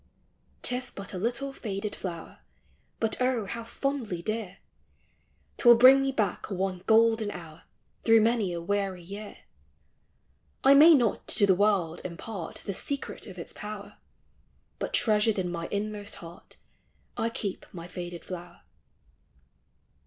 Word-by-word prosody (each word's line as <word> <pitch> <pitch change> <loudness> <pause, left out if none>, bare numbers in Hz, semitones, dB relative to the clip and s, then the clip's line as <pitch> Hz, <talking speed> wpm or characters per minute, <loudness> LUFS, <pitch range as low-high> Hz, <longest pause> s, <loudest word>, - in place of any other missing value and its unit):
'T 250 - +3
is 250 -1 -3
but 200 0 -7
a 185 - -4
little 245 +6 -2
faded 205 -3 -4
flower, 170 -3 -7 0.6
But 225 +2 -1
oh, 250 -4 +1
how 230 +4 -5
fondly 230 -7 -3
dear! 215 -3 -3 1.0
'T 240 - +5
will 240 - +10
bring 260 +3 +8
me 270 0 0
back 210 -8 -1
one 190 -2 -2
golden 225 -1 +4
hour, 165 -4 -10 0.4
Through 225 -1 +6
many 225 -4 +2
a 170 - -3
weary 190 0 -2
year. 200 +4 -8 1.3
I 270 - +7
may 310 +4 +9
not 240 -7 0
to 205 - +4
the 195 - +5
world 185 -4 +1
impart 180 +1 -6
The 200 - -3
secret 280 +6 -4
of 190 -2 -10
its 170 - -7
power, 210 -1 -8 0.8
But - - -2
treasured 215 -1 +3
in 180 -2 -1
my 170 -1 -4
inmost 205 0 -3
heart, 170 -2 -12 0.6
I 230 - 0
keep 205 -4 -5
my 170 -2 -8
faded 175 -1 -7
flower. 175 -1 -8
205 Hz, 145 wpm, -28 LUFS, 180-230 Hz, 1.3 s, will